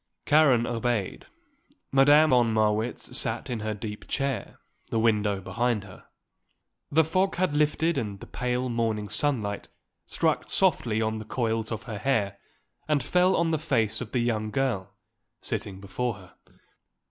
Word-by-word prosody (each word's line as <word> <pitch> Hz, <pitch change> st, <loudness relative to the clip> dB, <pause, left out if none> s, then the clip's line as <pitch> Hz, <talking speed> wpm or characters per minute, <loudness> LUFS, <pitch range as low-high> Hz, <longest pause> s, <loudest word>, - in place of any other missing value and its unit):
Karen 140 Hz, -6 st, +5 dB
obeyed. 115 Hz, -4 st, -2 dB, 0.6 s
Madame 145 Hz, +3 st, +6 dB
von 120 Hz, -3 st, +4 dB
Marwitz 110 Hz, +1 st, 0 dB
sat -, -, -1 dB
in 120 Hz, -, -2 dB
her 110 Hz, 0 st, -3 dB
deep 105 Hz, 0 st, -7 dB
chair, 135 Hz, -2 st, -2 dB, 0.3 s
the -, -, -1 dB
window 105 Hz, -3 st, +2 dB
behind 105 Hz, +4 st, -1 dB
her. 95 Hz, -2 st, -14 dB, 0.8 s
The 160 Hz, +3 st, +5 dB
fog 185 Hz, +5 st, +1 dB
had 175 Hz, -5 st, 0 dB
lifted 150 Hz, +1 st, +2 dB
and 100 Hz, -5 st, -5 dB
the -, -, -9 dB
pale 125 Hz, 0 st, -2 dB
morning 115 Hz, -3 st, -1 dB
sunlight 110 Hz, -9 st, -1 dB, 0.4 s
struck -, -, 0 dB
softly 110 Hz, -1 st, +2 dB
on 110 Hz, 0 st, -1 dB
the 110 Hz, -, -8 dB
coils 115 Hz, -2 st, -1 dB
of 110 Hz, -2 st, -4 dB
her 110 Hz, -3 st, -6 dB
hair 105 Hz, -6 st, 0 dB, 0.5 s
and 150 Hz, -4 st, +1 dB
fell 180 Hz, +6 st, +3 dB
on 165 Hz, -1 st, +1 dB
the 160 Hz, -, +1 dB
face 115 Hz, -8 st, 0 dB
of 120 Hz, -2 st, -6 dB
the 125 Hz, -, +1 dB
young 110 Hz, -2 st, -1 dB
girl 120 Hz, -7 st, -1 dB, 0.5 s
sitting 95 Hz, -2 st, -4 dB
before 115 Hz, +4 st, -3 dB
her. 95 Hz, -3 st, -15 dB
115 Hz, 150 wpm, -27 LUFS, 105-135 Hz, 0.8 s, Madame